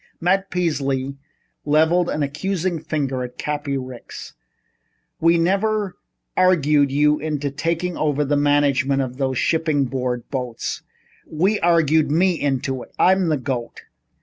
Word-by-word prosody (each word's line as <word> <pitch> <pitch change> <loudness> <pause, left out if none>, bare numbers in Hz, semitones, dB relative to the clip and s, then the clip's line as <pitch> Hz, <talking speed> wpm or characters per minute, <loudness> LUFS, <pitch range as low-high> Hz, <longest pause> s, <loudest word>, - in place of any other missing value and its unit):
Matt 190 +3 +1
Peasley 140 -6 -1 0.5
leveled 160 +4 +3
an 150 - -1
accusing 170 +4 -2
finger 140 -4 -2
at 125 0 -8
Cappy 145 -2 -2
Ricks. 130 -2 -8 0.9
"We 165 +1 +4
never 195 +2 0 0.4
argued 150 -6 +3
you 150 +2 +3
into 145 -2 -2
taking 165 +4 -2
over 150 -1 0
the 145 +1 +1
management 140 -1 +2
of 130 -1 -6
those 130 -2 -1
Shipping 155 -3 +1
Board 125 -2 -3
boats. 125 -4 -4 0.5
We 190 +7 +1
argued 160 -3 +3
me 180 +5 +3
into 135 -4 -2
it. - - -12
I'm 185 -1 +3
the 155 - +2
goat. 125 -3 -5
150 Hz, 130 wpm, -21 LUFS, 135-170 Hz, 0.9 s, We